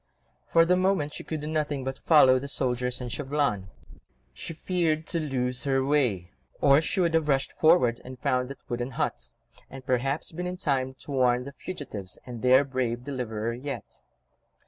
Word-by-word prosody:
For 165 0 +6
the 180 +2 +4
moment 185 -5 +1
she - - -7
could 155 -2 -4
do - - -5
nothing 150 -3 -1
but 135 0 -4
follow 130 -5 +6
the 140 - -6
soldiers 125 -2 -1
and 125 -2 -5
Chauvelin. 135 -9 -1 0.6
She - - -7
feared 165 -3 0
to 170 - -1
lose 125 -4 -2
her 135 -1 +1
way, 125 -12 +1 0.3
or 140 +1 +5
she 165 - -2
would 170 -2 +2
have 160 -2 +2
rushed 135 -2 +1
forward 155 -8 +3
and 130 0 -9
found 125 +1 0
that 140 - -11
wooden 120 0 -3
hut, - - -2 0.4
and 135 -1 -10
perhaps 135 +3 -1
been 180 +2 -4
in 180 0 -4
time 130 -5 -1
to - - -9
warn 125 -2 +2
the 140 +2 -9
fugitives 125 - -7
and 120 -3 -7
their 130 +2 +6
brave 125 -3 -2
deliverer 120 -4 -3
yet. 135 +4 -7
135 Hz, 180 wpm, -27 LUFS, 125-150 Hz, 0.6 s, For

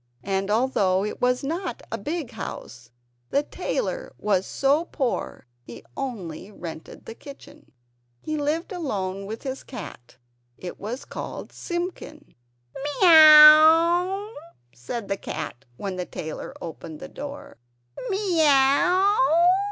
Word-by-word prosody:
And 195 0 -2
although 205 -5 +1
it 210 - -6
was 250 +2 +1
not 335 +7 -4
a - - -2
big 305 -5 -4
house, 125 - -8 0.4
the 285 - +1
tailor - - -4
was 195 -3 0
so 285 +5 +1
poor 265 - -3 0.2
he 120 -1 -12
only 195 -9 -6
rented 165 -5 -10
the - - -8
kitchen. 290 +4 -14 0.5
He 310 - -4
lived 305 +5 -2
alone 200 - -4
with 220 +2 -7
his 265 -1 -5
cat; 125 - -10 0.4
it 180 - -8
was 235 +6 -6
called - - -7
Simpkin. 345 -4 -6 0.7
"Miaw?" 325 +4 +7 0.4
said 195 - -6
the 195 - -2
cat 140 -7 -7
when 195 +1 -5
the 180 - -4
tailor 155 -1 -7
opened 160 -2 -8
the - - -8
door, 285 0 -9 0.5
"miaw?" 355 +1 +3
270 Hz, 120 wpm, -24 LUFS, 195-320 Hz, 0.7 s, Miaw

